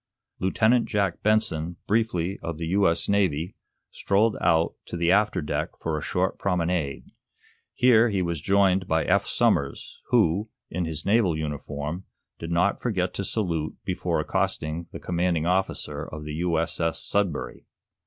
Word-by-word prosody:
Lieutenant 110 +6 +2
Jack 100 -4 0
Benson, 105 -6 +1
briefly 100 -4 0
of 85 -2 -4
the 85 - -4
U.S. 95 -3 +2
Navy, 90 -4 +1 0.4
strolled 105 +2 +1
out 85 -1 +3
to 85 - -5
the 85 +1 +2
after 105 -4 +2
deck 75 - -2
for 80 -1 -2
a 75 - -3
short - - -1
promenade. 85 -6 -1 0.6
Here 120 -2 +5
he 95 -3 0
was 85 -3 -2
joined 95 0 +3
by 80 -1 +1
Eph - - +2
Somers, - - 0
who, 105 -2 +2 0.2
in 90 +1 -1
his 80 -1 -4
naval 100 -6 +3
uniform, 75 +2 -4 0.3
did 80 - -6
not 90 +4 +1
forget 95 -7 -1
to 100 - -3
salute 85 -7 -2
before - - -1
accosting 80 +2 -1
the - - -7
commanding 85 -2 0
officer 90 -5 -1
of 75 -1 -8
the 75 0 -6
U.S.S. 80 -1 0
"Sudbury." 100 -7 -2
90 Hz, 145 wpm, -25 LUFS, 80-100 Hz, 0.6 s, Here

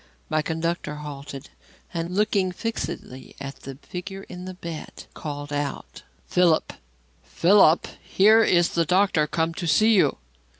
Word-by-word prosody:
My 155 - +2
conductor 160 -1 -2
halted, 145 -2 -8 0.4
and 170 +1 -3
looking 200 -2 +2
fixedly 180 - -5
at 140 0 -7
the 135 0 -9
figure 195 +2 -7
in 180 -1 -9
the 185 0 -7
bed, 170 -3 -8
called 145 -1 -6
out: 145 -1 -4 0.2
"Philip! 175 -3 +2 0.5
Philip! 175 -2 +4
Here 220 +3 +5
is 175 -4 +3
the 170 - +1
doctor 180 -3 +2
come 165 +1 -1
to 170 +1 -4
see 215 +9 +4
you." 195 - +3
170 Hz, 135 wpm, -24 LUFS, 150-185 Hz, 0.5 s, Here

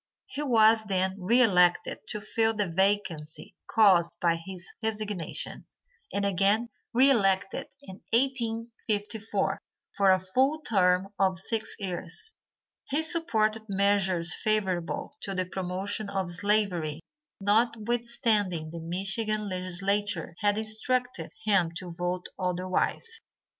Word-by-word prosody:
He 290 - -6
was 225 -5 +5
then 190 -1 0
re 235 +7 +4
elected 180 -5 +3
to 210 - -5
fill 225 +1 +1
the 205 -2 0
vacancy 175 -4 -1
caused 185 -6 +4
by 170 -1 +2
his 175 +1 -8
resignation, 210 -5 -3 0.4
and 200 0 -1
again 200 +4 +2 0.2
re 265 +4 +5
elected 195 -6 +1 0.2
in 190 -6 -11
1854 225 -3 -1 0.3
for 200 -1 +4
a 185 - +6
full 260 +12 +1
term 190 -5 +2
of 190 -1 +2
six 220 +4 -1
years. 185 - -5 0.6
He 290 +3 +1
supported 225 -10 +1
measures 190 -3 +2
favorable 215 +6 -1
to 195 - -3
the 185 0 0
promotion 190 +3 -3
of 190 -3 -2
slavery 180 -5 0 0.4
notwithstanding 220 - +1
the 170 - -6
Michigan 195 +5 -1
legislature 185 -1 -1
had 205 0 +2
instructed 245 +4 -1 0.2
him 195 -5 +3
to 180 -1 -6
vote 175 +1 -3
otherwise. 185 - -1
200 Hz, 115 wpm, -28 LUFS, 185-225 Hz, 0.6 s, a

